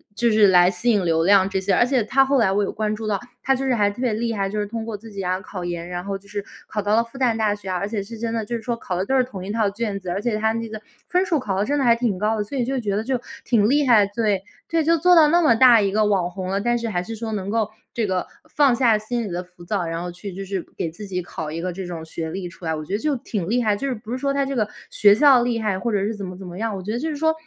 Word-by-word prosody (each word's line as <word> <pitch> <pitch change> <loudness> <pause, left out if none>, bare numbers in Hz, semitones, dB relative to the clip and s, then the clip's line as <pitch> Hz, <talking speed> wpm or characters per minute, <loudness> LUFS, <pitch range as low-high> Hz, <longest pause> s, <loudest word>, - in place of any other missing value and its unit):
就 235 +2 +2
是 215 -1 +6
来 180 -1 +6
吸 240 +4 -1
引 205 -5 +3
流 165 -1 +2
量 195 +1 +5
这 195 -1 -1
些。 195 +1 +1
而 240 - +4
且 250 -2 +1
她 270 +5 +3
后 275 +1 +2
来 205 -5 +3
我 205 +1 +2
有 - - -2
关 215 0 -2
注 220 +1 -6
到， 205 -2 0 0.2
她 270 - +3
就 270 +1 -3
是 260 -2 +2
还 205 -2 +3
特 205 - -9
别 250 -3 +1
厉 230 +2 -1
害， 195 -2 -1
就 210 +1 -3
是 205 - 0
通 225 +2 -5
过 225 -2 -4
自 220 +2 -13
己 200 -1 -5
啊， 185 +1 0
考 185 -2 -7
研， 170 -1 -4
然 175 0 -5
后 195 0 -3
就 200 +1 -21
是 205 0 -4 0.2
考 210 - -2
到 205 +1 +1
了 230 - +4
复 230 +3 -13
旦 240 -4 +2
大 215 -2 +2
学 205 -2 -8
啊， 185 - 0
而 200 +3 -2
且 210 -1 -2
是 225 +4 -9
真 225 0 -3
的， 225 -1 -1
就 235 - -3
是 230 - -4
说 240 0 -1
考 185 - -4
的 185 +2 -1
都 265 - 0
是 255 - +4
同 200 -7 -8
一 200 - -4
套 220 -2 +1
卷 205 -1 -3
子， 185 -2 -7
而 185 +3 -2
且 225 -1 0
她 220 +1 +1
那 230 0 -3
个 215 0 -7 0.3
分 365 +1 +2
数 330 -5 +1
考 200 -7 -2
得 200 - +1
真 290 +4 0
的 270 - +1
还 235 -1 +6
挺 235 -5 -1
高 215 +3 0
的。 210 - 0
所 240 +7 -6
以 250 - +1
就 265 +1 -1
觉 205 -4 -1
得 210 - -1
就 255 +1 -1 0.2
挺 215 -3 +3
厉 290 +2 +3
害， 220 -5 +6
对， 205 -2 -1 0.2
对， 330 -1 +1
就 330 +2 +3
做 360 +3 +5
到 320 -3 +7
那 340 +3 +4
么 300 -8 +5
大 240 -1 +7
一 200 -1 +1
个 215 +1 +2
网 190 -4 +1
红 185 +1 -6
了， 195 +1 0
但 240 +2 +1
是 230 -1 -3
还 175 -4 -1
是 225 +5 -6
说 220 0 -5
能 200 -2 -3
够 220 0 0 0.2
这 230 - 0
个 185 -2 -1 0.3
放 280 -4 +5
下 235 -3 +4
心 235 +3 -3
里 200 - -5
的 175 +1 -3
浮 180 -1 -17
躁， 195 0 -1
然 165 0 -3
后 175 0 -5
去 190 +3 -8
就 195 +2 -6
是 190 -2 -3
给 165 - -2
自 175 +6 -9
己 180 -1 -2
考 160 -3 -6
一 165 - -4
个 180 0 -3
这 190 +1 -6
种 170 -2 -6
学 160 0 -5
历 185 +1 -4
出 180 +1 -15
来。 160 - 0
我 155 0 -6
觉 190 - -6
得 205 - +1
就 300 +3 0
挺 200 -6 -4
厉 245 +3 +2
害， 210 -2 +2
就 275 +7 -3
是 265 - 0
不 220 0 -10
是 250 - -1
说 275 +1 -1
她 280 0 +1
这 275 0 -3
个 215 -4 +1 0.2
学 205 -1 +6
校 275 0 +6
厉 240 -1 0
害， 210 -4 0
或 235 +3 -2
者 205 - +1
是 220 - -1
怎 205 - -7
么 180 0 -7
怎 190 - -9
么 175 0 -8
样， 220 0 -2
我 190 - -5
觉 210 - -4
得 235 - -2
就 320 - -2
是 305 - -3
说 320 +2 +2
210 Hz, 365 characters per minute, -22 LUFS, 190-240 Hz, 0.3 s, 到